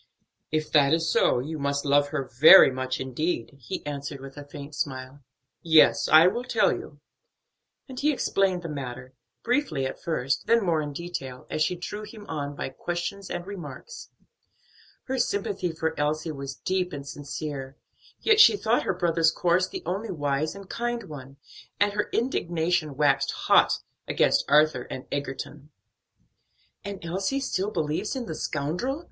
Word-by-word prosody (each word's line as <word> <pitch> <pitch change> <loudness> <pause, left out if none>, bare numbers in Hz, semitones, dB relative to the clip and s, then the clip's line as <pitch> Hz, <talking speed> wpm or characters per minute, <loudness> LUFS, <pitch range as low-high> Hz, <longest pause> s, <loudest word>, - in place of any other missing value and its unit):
"If 155 0 -1
that 145 0 +5
is 165 0 -1
so, - - +3
you 150 +5 -4
must 140 +1 -1
love 145 0 +4
her 145 -1 -2
very 135 +6 +8
much 130 0 -3
indeed," 130 0 -3
he 120 - -6
answered 140 -1 -5
with 135 0 -10
a 145 - -8
faint 145 +1 -10
smile. 130 -1 -4 0.4
"Yes, 160 -2 +5
I 155 +2 +8
will 235 +7 +1
tell 255 - +2
you." - - -8 0.9
And 260 -2 -8
he 300 +2 +3
explained 195 -9 0
the - - -4
matter; 130 -4 -6 0.3
briefly 240 - 0
at 130 - -5
first, 135 -5 -1
then 230 -3 +3
more 165 -3 +2
in 145 -1 -4
detail, 140 -5 -6
as 155 - -2
she 180 - +2
drew 190 +4 -6
him 215 0 -10
on 145 -2 -4
by - - -4
questions 175 +7 -5
and 175 0 -4
remarks. 200 - -9 0.9
Her 265 0 -3
sympathy 200 -5 -1
for 160 0 -2
Elsie 155 +2 -1
was 140 -2 -6
deep 185 +2 -2
and 140 -1 -7
sincere; 140 -1 -6 0.4
yet 435 -1 +4
she 425 - +8
thought 230 - +1
her 190 - -1
brother's 165 -2 +2
course 175 +2 +1
the - - -6
only 195 +6 -3
wise 145 -1 -1
and 200 -1 -10
kind 240 +2 -3
one, 140 -6 -10 0.4
and 205 0 +3
her 205 0 -1
indignation 170 - 0
waxed 140 -2 +2
hot - - +4 0.3
against - - +2
Arthur 150 -4 +4
and 130 - -6
Egerton. 140 +1 -5 1.1
"And 200 -3 -7
Elsie 190 +10 -1
still 205 -7 -1
believes 170 - -2
in 255 -2 -3
the 160 - -5
scoundrel?" 165 - -2
155 Hz, 165 wpm, -26 LUFS, 140-190 Hz, 1.1 s, very